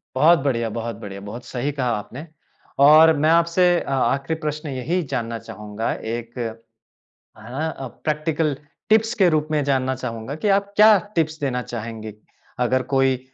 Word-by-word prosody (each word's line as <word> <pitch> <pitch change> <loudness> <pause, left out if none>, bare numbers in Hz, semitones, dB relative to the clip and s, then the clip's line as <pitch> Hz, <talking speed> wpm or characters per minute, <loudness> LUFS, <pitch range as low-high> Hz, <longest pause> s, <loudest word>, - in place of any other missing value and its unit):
बहुत 160 +6 +5
बढ़िया, 120 -5 -1
बहुत 115 0 -4
बढ़िया 100 -2 -8
बहुत 110 +5 -8
सही 135 +3 -3
कहा 130 -3 -2
आपने। 125 +9 -8 0.6
और 155 +2 +8
मैं 155 +2 +2
आपसे 170 +1 +3
अ, - - -6
आख़िरी 135 +4 0
प्रश्न 150 0 -4
यही 145 +8 -1
जानना 115 -3 -2
चाहूँगा, 105 +1 -5
एक, 115 +2 -6 1.0
हाँ 130 +9 -4
अ, 135 - -5 0.2
प्रैक्टिकल 155 -1 0 0.3
टिप्स 220 +2 +3
के 185 -3 +5
रूप 155 0 0
में 150 -1 +1
जानना 130 -1 0
चाहूँगा, 120 +1 -5
कि 205 +7 -2
आप 200 0 +1
क्या 210 -1 +7 0.2
टिप्स 160 -1 0
देना 125 -3 -1
चाहेंगी? 110 -2 -6 0.5
अगर 130 +1 +2
कोई 135 -1 +3
135 Hz, 160 wpm, -22 LUFS, 120-160 Hz, 1.0 s, और